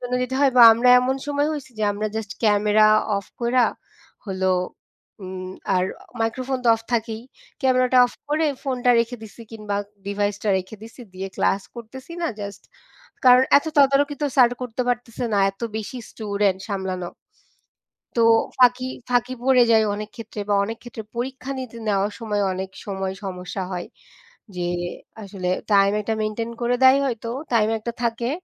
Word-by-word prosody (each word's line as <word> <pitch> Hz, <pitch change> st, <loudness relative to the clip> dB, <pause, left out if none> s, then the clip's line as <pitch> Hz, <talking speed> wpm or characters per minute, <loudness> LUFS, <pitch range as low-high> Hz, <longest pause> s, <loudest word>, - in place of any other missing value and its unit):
জন্য 250 Hz, 0 st, -3 dB
যেতে 255 Hz, +1 st, -2 dB
হয় 275 Hz, -2 st, +4 dB
বা 240 Hz, -, +10 dB
আমরা 235 Hz, +3 st, +2 dB
এমন 260 Hz, +1 st, 0 dB
সময় 290 Hz, 0 st, 0 dB
হইছি 290 Hz, -3 st, -6 dB
যে 215 Hz, -, +1 dB
আমরা 210 Hz, +1 st, -3 dB
জাস্ট 220 Hz, -2 st, -4 dB
ক্যামেরা 210 Hz, 0 st, +4 dB, 0.3 s
অফ 200 Hz, -, -4 dB
কইরা 240 Hz, +1 st, +3 dB, 0.6 s
হল 190 Hz, -1 st, -4 dB, 0.8 s
উম 185 Hz, 0 st, -6 dB, 0.2 s
আর 180 Hz, 0 st, +2 dB, 0.4 s
মাইক্রোফোন 255 Hz, +4 st, -1 dB
তো 235 Hz, -, +3 dB
অফ -, -, -12 dB
থাকেই। 225 Hz, -1 st, -1 dB, 0.4 s
ক্যামেরাটা 255 Hz, -1 st, +3 dB
অফ -, -, -11 dB, 0.2 s
করে 310 Hz, +1 st, +1 dB, 0.2 s
ফোনটা 250 Hz, -3 st, +1 dB
রেখে 235 Hz, +2 st, -3 dB
দিছি 220 Hz, +2 st, -11 dB
কিংবা 210 Hz, -2 st, -4 dB, 0.3 s
ডিভাইসটা 205 Hz, +1 st, -2 dB
রেখে 185 Hz, +4 st, -8 dB
দিছি 230 Hz, +3 st, -12 dB
দিয়ে 190 Hz, +1 st, -5 dB
ক্লাস 195 Hz, 0 st, +1 dB
করতেছি 260 Hz, +7 st, -10 dB
না 335 Hz, -, +1 dB
জাস্ট। 200 Hz, -1 st, -7 dB, 0.6 s
কারণ 250 Hz, +1 st, +7 dB
এত 285 Hz, -, -10 dB
তদারকি 280 Hz, +1 st, +4 dB
তো -, -, +2 dB
স্যার 245 Hz, -3 st, +6 dB
করতে 250 Hz, 0 st, -3 dB
পারতেছে 245 Hz, 0 st, -2 dB
না -, -, +2 dB
এত 195 Hz, -, -30 dB, 0.2 s
বেশি 220 Hz, +4 st, -5 dB
স্টুডেন্ট 200 Hz, -3 st, -1 dB
সামলানো। 190 Hz, -3 st, -3 dB, 1.1 s
তো 230 Hz, -, +3 dB, 0.4 s
ফাঁকি 250 Hz, 0 st, +4 dB, 0.2 s
ফাঁকি 245 Hz, +1 st, +1 dB
পড়ে 255 Hz, -2 st, +5 dB
যায় 220 Hz, -1 st, +5 dB
অনেক 210 Hz, +1 st, -6 dB
ক্ষেত্রে 220 Hz, -2 st, -7 dB
বা 205 Hz, -, +2 dB
অনেক 225 Hz, +2 st, -5 dB
ক্ষেত্রে 235 Hz, -2 st, -8 dB
পরীক্ষা 260 Hz, +2 st, -4 dB
নিতে 250 Hz, -3 st, -7 dB
নেওয়ার 200 Hz, +1 st, +1 dB
সময় 210 Hz, -2 st, -1 dB
অনেক 190 Hz, +1 st, -5 dB, 0.2 s
সময় 190 Hz, -1 st, -3 dB
সমস্যা 185 Hz, 0 st, -5 dB
হয়। 180 Hz, -1 st, -4 dB, 0.7 s
যে 175 Hz, -1 st, -2 dB, 0.6 s
আসলে 195 Hz, -2 st, -5 dB, 0.2 s
টাইম 200 Hz, 0 st, +5 dB
একটা 220 Hz, +2 st, -1 dB
মেইনটেইন 215 Hz, +2 st, -3 dB
করে 245 Hz, +1 st, +1 dB
দেয় 260 Hz, +1 st, +7 dB
হয়তো 230 Hz, -2 st, -3 dB, 0.2 s
টাইম 215 Hz, -2 st, +3 dB
একটা 235 Hz, +2 st, -5 dB
থাকে 235 Hz, +1 st, -1 dB
225 Hz, 160 wpm, -23 LUFS, 200-250 Hz, 1.1 s, বা